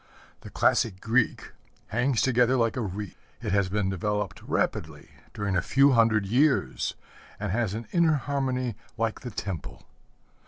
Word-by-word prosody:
The - - -11
classic 95 -5 +2
Greek 115 +3 0 0.4
hangs 120 +2 +1
together 125 0 +3
like 115 -2 +1
a 125 - -2
wreath. 100 -1 -5 0.2
It 110 -4 -4
has 100 -1 +2
been 100 -1 0
developed 105 +1 -2
rapidly, 75 -2 -2 0.2
during 100 -2 -2
a 90 - +3
few 140 +8 +4
hundred 115 -4 +3
years, 125 - +1 0.4
and - - -2
has 110 -2 0
an 115 -1 -6
inner 170 -3 +4
harmony 130 -3 -1 0.2
like 115 -1 -1
the 125 - -6
temple. 80 - -6
115 Hz, 150 wpm, -27 LUFS, 100-125 Hz, 0.4 s, few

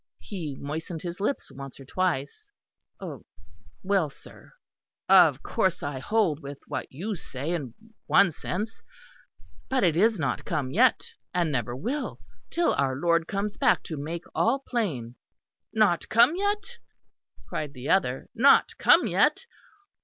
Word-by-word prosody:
He 160 -9 -6
moistened 160 +3 -5
his 175 +1 -5
lips 210 +8 -2
once 135 0 -9
or 135 - -11
twice. 185 - -2 1.3
"Well, 190 -5 +1
sir; - - -16 0.5
of - - +6
course - - 0
I 145 -2 -3
hold 190 -2 +1
with 140 -2 -8
what - - -5
you 200 +10 -4
say, 145 -2 -5
in 140 -9 -4 0.3
one 195 - +5
sense; 210 +8 -5 0.9
but 260 -3 +1
it 170 -4 +3
is 215 +5 +3
not 140 -7 -2
come 130 -3 -2
yet; 245 - +3 0.2
and 170 -3 +1
never 120 -2 -2
will, 235 - -3 0.3
till 340 0 +1
our 135 -2 0
Lord 170 +3 +1
comes 200 +1 -3
back - - +3
to 160 - -5
make 160 +4 -5
all 265 +4 +1
plain." 140 - -2 0.5
"Not 210 -6 +2
come 240 +8 +5
yet?" 415 +5 -2 0.7
cried 150 -2 -4
the 130 0 -7
other, 135 -9 +1
"Not 255 +5 +5
come - - +6
yet! - - +2
170 Hz, 140 wpm, -27 LUFS, 140-220 Hz, 1.3 s, of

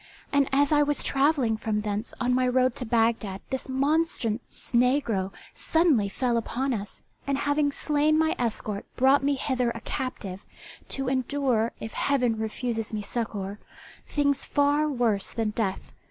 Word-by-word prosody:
And 280 -1 +3
as 280 +2 +3
I 295 -1 +5
was 290 0 +2
travelling 270 -5 +2
from 215 -1 -1
thence 210 +1 -3
on 250 -1 +1
my 255 0 +2
road 255 0 +3
to 250 - -2
Bagdad 225 -4 +1
this 265 0 -3
monstrous 275 -4 +1 0.3
negro 235 -6 +2 0.2
suddenly 310 - +2
fell 240 +3 0
upon 255 +4 -1
us, 205 -3 -6 0.2
and 275 -1 +1
having 285 +1 +1
slain 300 +1 +1
my 320 0 +2
escort 215 -3 -3
brought 265 +2 +4
me 285 0 +2
hither 255 -2 0
a 230 -1 -5
captive, 205 -7 -5 0.5
to 270 -1 -2
endure, 255 -3 0
if 220 - -6
Heaven 250 -5 +1
refuses 225 0 -3
me 210 - -3
succour, 205 -3 -4 0.5
things 285 -2 +1
far 290 +1 +2
worse 235 -7 +1
than 225 -2 -1
death. 210 -3 -3
250 Hz, 155 wpm, -26 LUFS, 220-280 Hz, 0.5 s, I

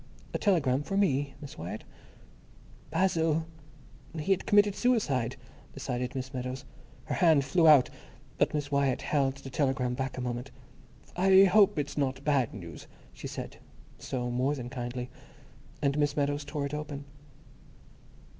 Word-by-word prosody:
"A - - -1
telegram 145 - +2
for 195 +6 -3
me, 145 -8 +1
Miss 145 - -9
Wyatt?" 85 +2 -6 1.1
Basil! 165 -2 +1 0.7
He 155 +5 -1
had 190 - +1
committed 205 0 +5
suicide, 145 - +1 0.4
decided 125 -2 -3
Miss 130 +1 -5
Meadows. 130 +1 -4 0.4
Her - - -3
hand 160 -6 +4
flew 165 +4 +3
out, 140 -5 +7 0.5
but - - +3
Miss 145 -1 -3
Wyatt 140 -2 +1
held 135 -3 +1
the 135 -1 -10
telegram 130 -3 0
back 130 +1 -3
a - - -3
moment. 125 +1 -4 0.7
"I 190 +1 +6
hope 195 -1 +5
it's 145 0 -2
not 135 -1 -1
bad 140 -5 +2
news," 85 -6 -9 0.3
she - - -7
said, - - -7 0.4
so 125 -2 -3
more 130 +4 +1
than 125 -3 -7
kindly. 125 -1 -5 0.7
And 140 +1 +1
Miss 145 0 +1
Meadows 145 0 0
tore 140 0 -3
it 140 - -5
open. 145 -1 -5
140 Hz, 145 wpm, -29 LUFS, 130-155 Hz, 1.1 s, out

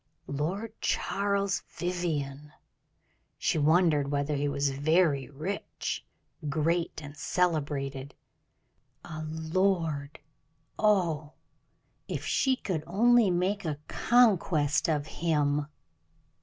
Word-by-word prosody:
Lord 175 +10 -3
Charles 200 0 0 0.2
Vivianne! 150 -5 -3 0.8
she - - +1
wondered 155 -2 +3
whether 145 +1 0
he 145 +1 0
was 140 0 0
very 145 0 +2
rich, 155 +8 -4 0.5
great, 165 +3 0
and 145 +1 -9
celebrated. 145 -5 -1 0.9
A 155 -2 -6
lord! 160 -3 0 0.6
oh, 170 -8 +2 0.7
if - - -4
she 265 -1 +2
could 180 -10 -3
only 230 +4 +4
make 185 +4 0
a 155 -4 -2
conquest 185 - +3
of 150 -2 0
him! 150 -3 0
160 Hz, 90 wpm, -29 LUFS, 145-185 Hz, 0.9 s, only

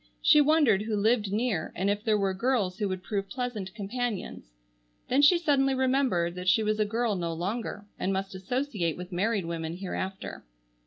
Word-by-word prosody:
She 300 -1 +6
wondered 290 -9 +4
who 215 0 -2
lived 210 0 +2
near, 210 -6 -1
and 190 +3 -1
if 205 +1 0
there 220 -2 +2
were 195 -2 0
girls 205 -3 0
who 205 -2 0
would 185 -1 -4
prove 195 -1 -3
pleasant 230 -7 -4
companions. 210 - -4 0.6
Then 265 +3 +4
she 320 +5 +7
suddenly 275 -5 +2
remembered 255 -10 +1
that 180 +1 -7
she 220 +4 +4
was 215 0 0
a 215 - +3
girl 225 +1 0
no 170 -2 -2
longer 205 +4 -4
and 190 - 0
must 195 0 -2
associate 190 - -2
with 180 +1 -8
married 200 +1 0
women 165 0 -4
hereafter. 190 0 -5
205 Hz, 180 wpm, -28 LUFS, 185-245 Hz, 0.6 s, she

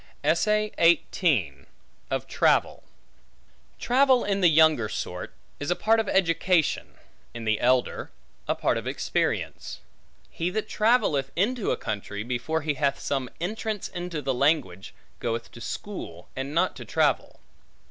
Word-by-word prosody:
Of 155 +3 +3 1.8
Travel - - +2 0.9
TRAVEL, 260 0 +3
in 200 -1 0
the 180 - +6
younger 155 -8 +4
sort, - - -5 0.3
is 145 - -4
a 175 - +2
part 225 +4 +3
of 220 - -1
education, 175 -2 +1 0.4
in 115 -1 -6
the 110 -1 +1
elder, 125 0 +1 0.4
a - - +1
part - - +1
of - - -8
experience. - - -2 0.5
He 170 +2 -2
that 215 +3 -3
travelleth 210 - +2
into 220 +5 0
a - - +1
country, 105 0 -4
before 125 +7 -2
he 150 -1 0
hath 140 0 0
some 135 -3 -2
entrance 215 +3 -3
into 175 -4 -5
the 135 - 0
language, 130 - 0 0.2
goeth 115 0 -3
to 120 - -12
school, 115 - -7
and 135 +2 -4
not 170 +4 +1
to - - -8
travel. - - 0
160 Hz, 135 wpm, -26 LUFS, 125-195 Hz, 1.8 s, the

